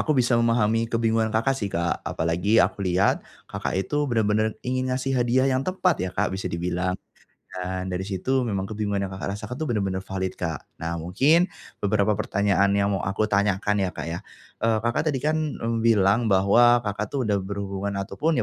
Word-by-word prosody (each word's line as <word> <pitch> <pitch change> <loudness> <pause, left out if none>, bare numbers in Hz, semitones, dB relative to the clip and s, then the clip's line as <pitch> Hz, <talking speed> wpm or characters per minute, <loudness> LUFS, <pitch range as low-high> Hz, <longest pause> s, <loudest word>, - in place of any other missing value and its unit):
aku 155 -2 +1
bisa 125 -1 +2
memahami 115 -1 +2
kebingungan 115 -1 +1
Kakak 115 +5 +1
sih 115 -7 -3
Kak, 85 -2 -1
apalagi 85 +7 0
aku 105 - +3
lihat, 90 +2 +2 0.2
Kakak, - - -4
itu 145 +9 0
benar-benar 110 -2 +1
ingin 130 +1 -1
ngasih 130 +1 -1
hadiah 125 0 +2
yang 130 -1 +2
tepat 185 +3 0
ya 95 - -1
Kak, 105 0 +1
bisa 95 +1 -3
dibilang, 90 +2 -2 0.6
dan 95 0 -3
dari 90 0 -3
situ 105 +8 -1
memang 100 -5 -2
kebingungan 105 -1 -2
yang 95 - -8
Kakak, 100 +1 -4
rasakan 110 +3 -6
itu 155 +5 -3
benar-benar 95 -4 -1
valid 95 -1 -3
Kak, 80 -3 -4 0.2
nah 85 +1 -2
mungkin, 135 - +3 0.3
beberapa 105 0 +1
pertanyaan 100 0 +2
yang 100 0 +2
mau 100 - 0
aku 105 +2 0
tanyakan 100 0 +1
ya 95 -2 0
Kak, - - -5
ya, 85 - -3 0.4
eee, 115 0 +2
Kakak 120 +7 0
tadi 135 -4 0
kan, 155 +2 +1
mmm, 115 -7 -2
bilang 110 +1 +4
bahwa 115 +5 +5
Kakak, 105 0 -2
tuh 135 - +1
udah 105 -4 +1
berhubungan 100 0 -4
ataupun 150 +12 0
105 Hz, 185 wpm, -25 LUFS, 95-120 Hz, 0.6 s, bahwa